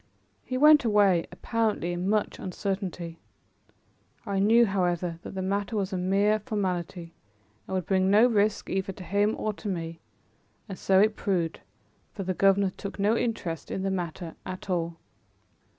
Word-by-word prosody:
He 255 - -3
went 300 +1 +7
away, 205 -6 +3
apparently 220 -7 -1
in 180 +2 -2
much 215 0 0
uncertainty. 185 -3 -4 1.1
I 200 -2 -1
knew, 225 +4 +5
however, 175 -4 -1
that - - -9
the 190 - -2
matter 200 +2 -1
was 195 -1 -2
a - - 0
mere 200 +4 +2
formality 180 -5 -3 0.5
and 190 - -3
would 185 - -1
bring 190 -1 +2
no 210 +4 +6
risk 210 -3 +1
either 190 0 -2
to 185 - -10
him 205 +4 +1
or 215 - -2
to 210 - -8
me; 165 -3 -4 0.7
and 195 -3 -7
so 190 -1 +4
it 210 +1 +4
proved, 175 -5 -1 0.5
for 195 - -5
the 185 0 -1
governor 195 +1 +3
took 200 +1 -7
no 205 +3 +2
interest 180 - -3
in 190 - -3
the 195 - 0
matter 175 -2 -4
at 185 +1 -6
all. 170 -1 -1
195 Hz, 165 wpm, -27 LUFS, 180-210 Hz, 1.1 s, went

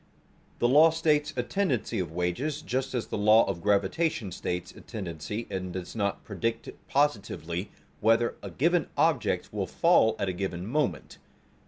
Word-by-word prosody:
The 120 - +2
law 150 +6 +7
states 155 -2 +1
a 125 - +1
tendency 155 - -1
of 90 -4 -3
wages, 90 - -2
just 130 0 -2
as 120 - -1
the - - -4
law 110 +2 +6
of 85 -3 -3
gravitation 105 - +1
states 90 +1 -4
a - - -14
tendency 100 +1 -5
and 95 -1 -3
does 90 +2 -6
not 100 -2 -1
predict 115 +3 -3 0.2
positively 100 - -1 0.3
whether 115 +2 +3
a - - -6
given 170 +2 +1
object - - +1
will - - -2
fall 110 - +4
at 100 - -1
a 95 - -1
given 90 -1 -4
moment. 115 - -2
110 Hz, 160 wpm, -28 LUFS, 95-140 Hz, 0.3 s, law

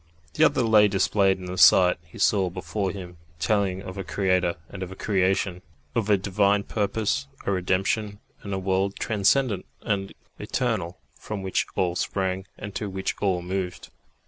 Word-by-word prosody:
The - - +3
other 125 - +4
lay 110 -2 +6
displayed 95 0 +2
in 95 - -9
the 90 0 -4
sight 90 +1 +7
he 85 - -15
saw 95 -3 +3
before 100 +2 -3
him, 90 -2 -8 0.2
telling 95 +2 0
of 95 +1 -7
a - - -3
Creator 90 -2 +1
and 95 - -9
of 95 0 -5
a - - -8
creation, 95 -2 0 0.3
of 110 -2 -1
a 100 - +5
Divine 100 +1 +2
purpose, 105 +6 -1 0.2
a - - +1
redemption, 95 +3 0 0.2
and 100 - -7
a 95 - -1
world 95 +1 0
transcendent 105 -1 +1 0.2
and 100 -3 -1 0.3
eternal 100 -9 -2 0.2
from 105 -3 -6
which 95 - 0
all 90 -2 0
sprang 95 0 -2
and 105 -1 -7
to 105 -1 -3
which 95 0 -2
all 95 -3 +1
moved. 90 0 -4
95 Hz, 170 wpm, -25 LUFS, 95-100 Hz, 0.3 s, sight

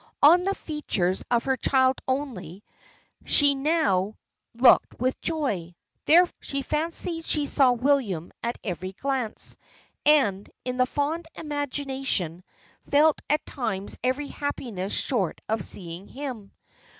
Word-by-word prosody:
On 345 +5 +7
the 395 0 0
features 195 - -2
of 240 -1 +2
her 265 -1 +1
child 260 +1 +2
only, 215 - -3 0.6
she 285 -1 +5
now 270 - +1 0.4
looked 245 +1 +5
with 255 +2 -1
joy; 210 - -2 0.3
there, 345 +4 +7
she 275 0 -3
fancied 330 +2 -2
she 300 -2 +1
saw 265 -3 +4
William 240 - 0
at 235 +1 -2
every 185 -1 -4
glance, 260 -1 -3 0.5
and, 220 -10 +3 0.2
in 250 0 -3
the 255 0 +3
fond 310 +5 -2
imagination, 270 - -3 0.5
felt 300 +2 +4
at 300 +1 +1
times 200 -7 -4
every 260 +3 0
happiness 225 -9 -4
short 200 - 0
of 220 -3 -1
seeing 175 +1 -5
him. 255 -7 -7
260 Hz, 125 wpm, -26 LUFS, 200-290 Hz, 0.6 s, On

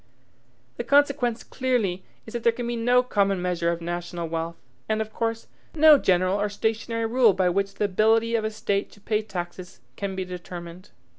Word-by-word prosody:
The - - -2
consequence 280 -5 +2
clearly 225 -9 -1 0.2
is 220 - -11
that 235 - -3
there 235 - +4
can 240 +1 -5
be 240 0 -2
no 245 +2 +3
common 200 -5 +1
measure 175 -1 0
of 170 0 -4
national 175 0 -4
wealth, 165 +1 -3 0.3
and, 215 0 +1
of 220 0 -4
course, 225 -1 -2 0.3
no 305 -2 +7
general 185 +1 +2
or 210 - 0
stationary 225 +2 -2
rule 230 -2 +4
by 185 -1 +2
which 195 +2 -1
the 210 - 0
ability 220 +4 +2
of 225 -2 +1
a 215 - 0
state 200 -2 -2
to - - -17
pay 210 +1 0
taxes 180 -3 -7 0.2
can 200 -1 -3
be 190 0 -3
determined. 180 0 -9
205 Hz, 190 wpm, -25 LUFS, 180-230 Hz, 0.3 s, no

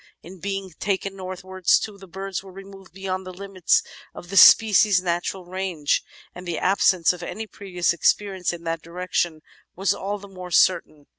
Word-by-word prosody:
In 185 +2 -12
being 195 0 -4
taken 195 0 -2
northwards, 185 -1 0
too, 205 -2 -6
the 195 - -13
birds 190 +1 -5
were 190 -1 -13
removed 195 0 -13
beyond 190 +1 -4
the 185 - -8
limits 190 -1 0 0.3
of 175 - -10
the - - -4
species' 205 +1 +7
natural 180 +1 -3
range, 180 -5 -1 0.3
and 180 0 -10
the 170 -2 -2
absence 185 -2 +3
of 180 - -10
any 200 +5 -5
previous 180 -4 -2
experience 190 +2 +1
in 170 -1 -8
that 165 -1 -3
direction 170 -1 -2 0.3
was 195 +2 +1
all 205 +2 -4
the 200 0 -12
more 185 -2 -9
certain. 170 -5 +2
185 Hz, 170 wpm, -23 LUFS, 175-195 Hz, 0.3 s, species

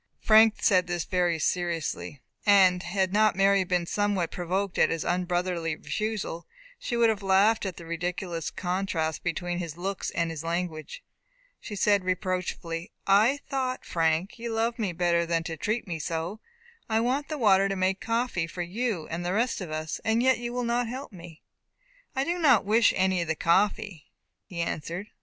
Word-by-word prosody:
Frank 220 0 +5
said 185 -3 +4
this 175 -1 -2
very 175 -2 +1
seriously, 165 -4 -2 0.2
and 190 -3 +5
had 190 +1 -1
not 215 0 +4
Mary 195 0 +4
been 180 -1 0
somewhat 205 -2 0
provoked 185 +2 -2
at - - +5
his 165 -1 -2
unbrotherly 175 -2 -1
refusal, 210 -4 -4 0.3
she 240 - -3
would 230 -1 +5
have 215 -2 -1
laughed 195 +2 +3
at 185 - -6
the 170 - -9
ridiculous 170 0 -3
contrast 180 -4 -2
between 175 0 -2
his 170 -3 -5
looks 190 +1 -3
and 170 -1 -1
his 160 -2 -6
language. 170 - -4 0.6
She 210 - -7
said, 205 -1 +3
reproachfully, 180 -1 -3
"I 220 +9 +4
thought, 260 -2 -2
Frank, 165 +5 0
you 235 0 -4
loved 230 +2 -1
me 205 -5 0
better 170 0 +1
than 165 -1 0
to 165 0 -4
treat 215 +8 -2
me 165 -3 -4
so. 165 +6 -3 0.5
I 220 0 +2
want 260 +5 0
the 305 - -4
water 195 -5 +4
to 195 - -1
make 190 0 0
coffee 230 -7 -1
for 175 +1 -4
you, 195 -2 -2
and 170 +1 -4
the 175 +1 -1
rest 230 +1 0
of 180 - -5
us, 155 0 -4
and 225 +2 +2
yet 260 -2 +3
you 240 0 -4
will 245 0 -2
not 240 0 0
help 260 +3 -6
me." 170 -4 -12 0.7
"I 265 - +1
do 345 +4 -2
not 270 - +5
wish 225 +2 +4
any 185 -1 +2
of 170 - -3
the 160 - 0
coffee," 195 0 +1 0.4
he 170 -2 -5
answered. 170 +5 -4
185 Hz, 180 wpm, -27 LUFS, 170-220 Hz, 0.7 s, Frank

